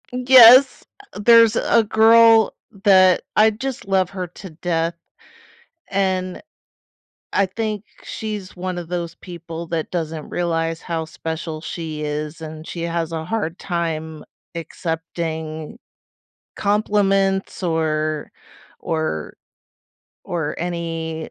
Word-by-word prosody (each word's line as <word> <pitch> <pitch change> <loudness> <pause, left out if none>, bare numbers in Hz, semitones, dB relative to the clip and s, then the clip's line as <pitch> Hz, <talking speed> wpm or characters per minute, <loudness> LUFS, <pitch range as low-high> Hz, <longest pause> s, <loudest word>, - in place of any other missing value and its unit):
Yes, 255 +1 +7 0.4
there's 230 +1 +6
a 230 0 +3
girl 225 +1 +5 0.3
that 185 -3 +5
I 215 +1 +6
just 235 +2 -5
love 190 -2 +1
her 185 -2 -4
to 180 +2 -12
death, 165 +1 -1 1.0
and 185 -2 -1 0.9
I 200 - +2
think 215 +1 -3 0.2
she's 210 -4 -6
one 180 0 -4
of 175 -2 -6
those 170 -1 -4
people 170 -1 -8
that 165 -1 -3
doesn't 160 -3 -4
realize 165 -1 -1
how 165 -2 -3
special 160 0 -5
she 160 -2 -6
is, 150 +2 -4
and 155 0 -8
she 170 0 -6
has 170 -1 -2
a 160 -1 -4
hard 180 -3 -3
time 160 -3 -3 0.3
accepting 160 +1 -5 0.8
compliments 195 -2 +1
or 155 -2 -1 0.5
or 155 - -3 0.9
or 160 -4 -3
any 165 -2 -4
170 Hz, 105 wpm, -21 LUFS, 160-200 Hz, 1.0 s, Yes